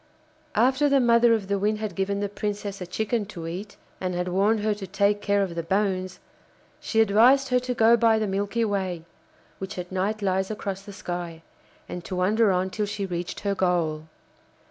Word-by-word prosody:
After 260 +6 +3
the 280 -1 +4
mother 235 -1 +5
of 205 -3 -4
the 200 0 0
Wind 210 +2 +1
had 215 -1 -4
given 200 +1 -1
the 205 - 0
Princess 205 -1 -4
a 180 - -5
chicken 220 +4 -1
to 170 -5 -8
eat, 195 +5 -7 0.2
and 180 -1 -2
had 180 +1 -2
warned 205 +4 +2
her 215 0 +1
to 200 -2 -7
take 205 +1 +1
care 200 -1 +2
of 185 -3 -4
the 170 - -2
bones, 185 0 -1 0.6
she 225 - +1
advised 240 +6 +5
her 250 0 +3
to 250 0 -3
go 230 +1 +6
by 230 -1 +4
the 220 - 0
Milky 205 +3 -1
Way, 190 -5 -2 0.5
which 190 0 -6
at 180 0 -6
night 200 +3 -1
lies 190 0 0
across 200 -2 -4
the 205 +1 -11
sky, 175 -3 -6 0.4
and 180 - -6
to 185 - -4
wander 205 +4 +3
on 185 +1 0
till 210 0 -2
she 205 -1 -3
reached 175 -2 -4
her 200 -1 0
goal. 170 -5 0
200 Hz, 200 wpm, -25 LUFS, 185-220 Hz, 0.6 s, go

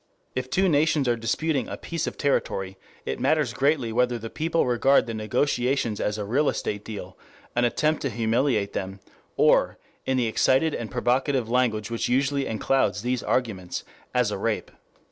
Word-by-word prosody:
If 130 0 -3
two 190 +8 +2
nations 150 -3 +2
are 120 - +3
disputing 130 +4 -1
a - - -5
piece 165 -2 -4
of - - -5
territory, 95 -9 -1 0.3
it 65 - -3
matters 150 -7 +1
greatly 135 -5 +1
whether 125 0 +2
the 115 0 -7
people 165 +1 0
regard 125 +3 +3
the 115 - -5
negotiations 120 +1 0
as 105 0 -1
a 105 - -3
real 135 +8 +2
estate 105 0 -3
deal, 105 -2 -8 0.4
an 120 0 +3
attempt 155 +5 +1
to 140 - -1
humiliate 115 -2 0
them, 95 +1 -4 0.4
or, - - +4 0.3
in 130 0 +1
the 125 - +2
excited 130 +7 +2
and 115 -2 -4
provocative 125 0 0
language 115 -4 +1
which 115 - -1
usually 140 +2 +1
enclouds 110 -2 0
these 125 0 0
arguments, 95 -8 -2 0.3
as - - +1
a - - -3
rape. - - -2
125 Hz, 170 wpm, -25 LUFS, 110-140 Hz, 0.4 s, or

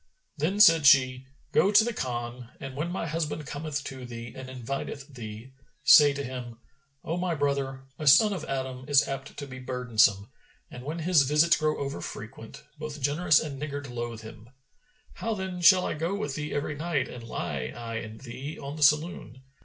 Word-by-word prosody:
Then 170 +6 -1
said 165 -8 +7
she, 130 -1 +5 0.2
"Go 200 - +4
to 210 +1 +7
the 240 +1 -2
Khan 120 - -4
and, 135 -1 -7
when 155 +5 -2
my 175 -1 -3
husband 150 -1 -3
cometh 150 0 -4
to 130 -2 -7
thee 120 -1 -8
and 130 -1 -8
inviteth 135 +3 -6
thee, 115 +1 -9 0.3
say 145 -1 +8
to 140 0 -4
him, 125 -3 -7 0.5
'O 165 - -3
my 180 -2 -1
brother, 140 -2 -1 0.2
a 155 - -3
son 210 +10 +7
of 190 - -5
Adam 130 -1 -4
is 145 -2 +4
apt 135 0 -6
to 145 - -5
be 130 -2 -9
burdensome, 115 -6 +1 0.4
and 125 - -9
when 155 +5 -4
his 170 -1 +4
visits 150 +5 +4
grow 155 0 0
over 140 0 -4
frequent, 115 +5 -9 0.2
both 155 -1 -6
generous 150 +3 +3
and 140 -3 -5
niggard 145 -2 -5
loathe 120 -2 -5
him.[FN#421] 110 +2 -13 0.6
How 225 -1 -3
then 190 -2 -5
shall 185 +1 +7
I - - -1
go 165 +5 -2
with 145 -8 -3
thee 150 +1 -4
every 145 +1 -2
night 150 -1 -1
and 120 -2 -9
lie 70 - -4
I 115 -1 -5
and 110 -1 -8
thee, 135 +4 -7
on 140 +1 -7
the - - -8
saloon? 150 -3 +1
140 Hz, 190 wpm, -27 LUFS, 125-155 Hz, 0.6 s, say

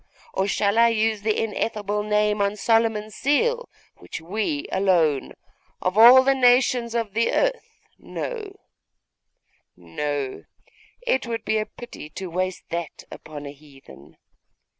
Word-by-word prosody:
Or 190 +1 0
shall 200 +2 +1
I 235 - +7
use 220 -2 +1
the 215 0 0
ineffable 210 -1 -2
name 210 0 +1
on 200 +1 +1
Solomon's 225 -1 +1
seal, 475 - 0 0.3
which - - -8
we 220 - -3
alone, 170 -7 +1 0.5
of 185 +1 -1
all 245 +4 +9
the 275 +1 +3
nations 245 -2 +3
of 225 -4 -2
the 230 +2 +1
earth, - - -1 0.2
know? 425 -5 -6 1.2
No; 135 - -4 0.6
it 260 - +1
would 230 -1 -4
be 220 - +1
a 215 - -3
pity 240 -10 -10
to 185 -2 -6
waste 185 +1 -2
that 170 -2 -5
upon 150 -2 -9
a 140 - -6
heathen. 140 - -17
210 Hz, 135 wpm, -23 LUFS, 185-235 Hz, 1.2 s, all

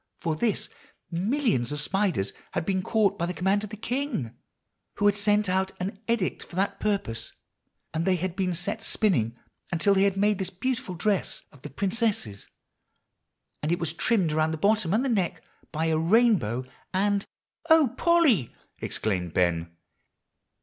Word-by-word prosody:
For 160 -2 -1
this, 215 +5 +1 0.4
millions 195 - 0
of 150 - -3
spiders 175 - 0 0.2
had - - -1
been 190 -1 0
caught 200 -1 +1
by 170 - 0
the 180 - -4
command 195 +3 +1
of 210 - -5
the 215 - -8
king, 240 - -3 0.6
who 205 - 0
had 205 -1 +5
sent 205 0 +2
out 190 +1 0
an 195 +3 -4
edict 230 -5 0
for - - -11
that 195 +2 0
purpose; 200 - -2 0.6
and 160 - 0
they 185 +1 +3
had 180 0 -3
been 185 -2 0
set 205 +6 -2
spinning 125 - +2 0.3
until 175 +4 +3
they 190 - +3
had 195 -1 +2
made 205 0 +2
this 190 -2 -2
beautiful 195 -1 -3
dress 200 +2 0
of 140 - -18
the 145 - -7
princess. 195 - -1 1.1
And 150 - -1
it 175 - +2
was 165 -2 -2
trimmed 185 -2 +1
around 155 +1 +2
the 160 - -2
bottom 205 0 +2
and 225 +7 +2
the - - 0
neck 185 -6 0 0.3
by 160 0 -1
a 160 -1 +2
rainbow, 170 - +3 0.3
and" 200 +1 +1 0.5
"O 320 -5 +6
Polly!" 315 - +3 0.2
exclaimed 90 -6 -2
Ben. 85 -2 +1
190 Hz, 165 wpm, -27 LUFS, 160-210 Hz, 1.1 s, O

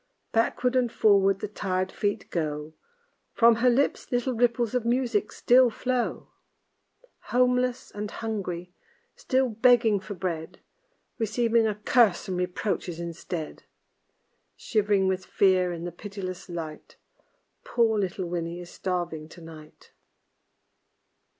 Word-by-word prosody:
Backward 245 +2 +1
and 245 -2 +2
forward 195 -3 +3
the - - -2
tired 185 -2 -2
feet 205 -1 -2
go, 150 -2 -3 0.6
From 230 -1 +5
her 250 +2 +4
lips 265 +4 0
little 245 +1 0
ripples 235 -1 +1
of 250 -2 0
music 235 -3 0
still 250 0 +5
flow. 250 +2 -2 1.0
Homeless 250 0 +1
and 205 0 -5
hungry, 180 -6 -5 0.4
still 260 -1 +1
begging 230 -2 +4
for 195 +2 -8
bread, 170 -3 -4 0.6
Receiving 230 +1 +2
a 210 - -1
curse 210 -2 +3
and 185 - -2
reproaches 180 -1 -2
instead; 170 -1 -6 1.0
Shiv'ring 205 -3 +1
with 190 0 -1
fear 185 -2 +2
in 170 -1 -6
the 175 - -4
pitiless 190 0 -7
light, 160 -3 -7 0.7
Poor 225 -3 +2
little 190 -1 -2
Winnie 170 0 -4
is 175 0 -10
starving 175 -4 -3
to 175 - -13
night. 155 -2 -13
205 Hz, 120 wpm, -26 LUFS, 175-235 Hz, 1.0 s, From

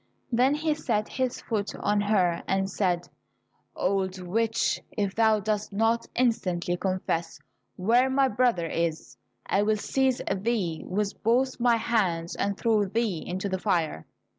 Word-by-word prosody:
Then 255 +4 +3
he 310 0 0
set 215 -8 -1
his 255 -1 -2
foot 210 -3 -3
on 205 0 +1
her 185 -5 +2
and 195 0 +1
said, 180 -3 -1 0.7
Old 190 0 -1
witch, 225 +5 0 0.2
if 200 -2 0
thou 220 -1 +3
dost 210 0 -2
not 225 +3 +1
instantly 180 -8 +1
confess 180 -3 -2 0.4
where 235 +7 +3
my 270 0 +3
brother 235 -7 +1
is, 165 -1 -2 0.3
I 195 - +1
will 215 +1 +2
seize 260 +4 +1 0.2
thee 190 -6 -1
with 205 +2 -2
both 255 +4 +1
my 240 -1 +4
hands 185 -8 0
and 200 -1 -1
throw 220 -3 +2
thee 205 -4 -1
into 185 +3 -3
the 190 -1 -2
fire. 160 - -1
205 Hz, 145 wpm, -27 LUFS, 185-230 Hz, 0.7 s, my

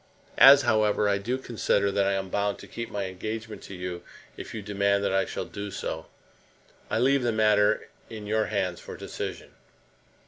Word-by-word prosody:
As, 140 +1 +9
however, 110 -3 +2
I 100 0 +2
do 120 +6 -2
consider 105 -5 0
that 100 0 +1
I 100 - +2
am 95 -1 -2
bound 100 +1 0
to - - -12
keep 115 -1 -6
my 100 -1 -3
engagement 110 +4 -6
to 100 - -8
you 90 -1 -5 0.3
if - - -8
you 110 - -6
demand 100 0 +1
that 100 - 0
I 95 0 +2
shall - - -4
do 100 0 -6
so, 80 -4 -5 0.8
I - - 0
leave 135 +3 +3
the 120 -1 +1
matter 105 -1 +3 0.2
in 110 -2 -8
your 110 +1 +1
hands 95 -4 -2
for - - -9
decision. - - -6
105 Hz, 185 wpm, -27 LUFS, 100-110 Hz, 0.8 s, As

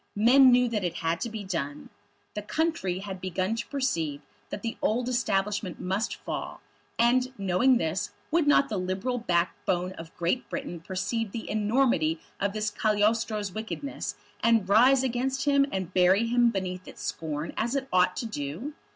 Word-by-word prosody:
Men 255 +5 +7
knew 250 0 +5
that 220 -4 -2
it 175 -2 -2
had 165 0 -1
to 235 - -2
be 220 -2 -6
done. 150 -7 -4 0.4
The 210 - -4
country 210 - -1
had 190 -2 -6
begun 185 +3 -1
to 230 - -4
perceive 165 - -1 0.3
that 205 - -6
the 230 0 -3
old 240 +3 +1
Establishment 210 -6 -1
must 190 +5 -1
fall; - - -5 0.4
and, 250 +2 +3
knowing 200 +7 +3
this, 165 +1 -1 0.2
would 330 -2 +2
not 280 -1 +5
the 215 - -3
Liberal 190 +7 -2
backbone 180 -1 0
of 165 0 -11
Great 175 +9 -1
Britain 275 -12 -5
perceive 195 +5 -3
the 225 - -6
enormity 215 -7 +1 0.2
of 200 0 0
this 215 0 -1
Cagliostro's 215 -1 +1
wickedness, 220 +6 -5 0.3
and 230 -4 +3
rise 250 +6 +5
against 260 +2 -1
him 280 -1 +4
and 185 -2 -3
bury 185 +4 +4
him 240 +1 +3
beneath 185 -3 -4
its - - -10
scorn 155 0 -4
as 235 +4 -1
it 270 -1 -1
ought 180 0 +4
to - - -2
do? 210 - -5
210 Hz, 170 wpm, -27 LUFS, 185-245 Hz, 0.4 s, Men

